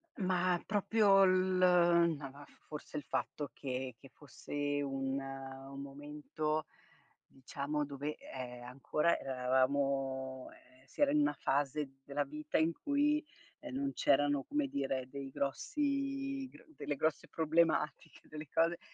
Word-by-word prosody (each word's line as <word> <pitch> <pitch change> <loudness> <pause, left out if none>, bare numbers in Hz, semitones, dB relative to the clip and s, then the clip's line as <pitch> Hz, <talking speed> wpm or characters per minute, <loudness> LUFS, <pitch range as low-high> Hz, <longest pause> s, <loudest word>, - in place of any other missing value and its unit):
Ma 185 -4 +2
proprio 205 -1 +5
l 185 0 +3 0.6
ma 140 -2 -6
va 145 +1 -12
f - - -22
forse 150 0 -6
il 145 - -3
fatto 145 +1 -3
che 130 -2 -4
che 135 - -14
fosse 145 +1 -3
un 135 -1 -1
un 135 0 -7
momento, 150 +2 -3 0.6
diciamo, 140 +2 -3
dove, 145 +1 -4
ehm, 125 -2 -7
ancora 140 +6 +1
eravamo 130 0 0
ehm, 130 +1 -20
si 135 - -9
era 285 -1 +5
in 300 - +4
una 295 +1 +3
fase 140 0 0
della 145 +1 -1
vita 150 +2 -3
in 160 +1 +3
cui, 295 - +2 0.4
ehm, 300 -3 -7
non 275 0 -1
c'erano, 145 0 +3
come 295 -1 0
dire, 135 - -2
dei 140 0 -6
grossi 275 - -1
gr - - -16
delle 145 - -3
grosse 155 +3 0
problematiche, 160 0 +1
delle 155 0 -8
cose 165 +1 +2
145 Hz, 135 wpm, -34 LUFS, 135-180 Hz, 0.6 s, proprio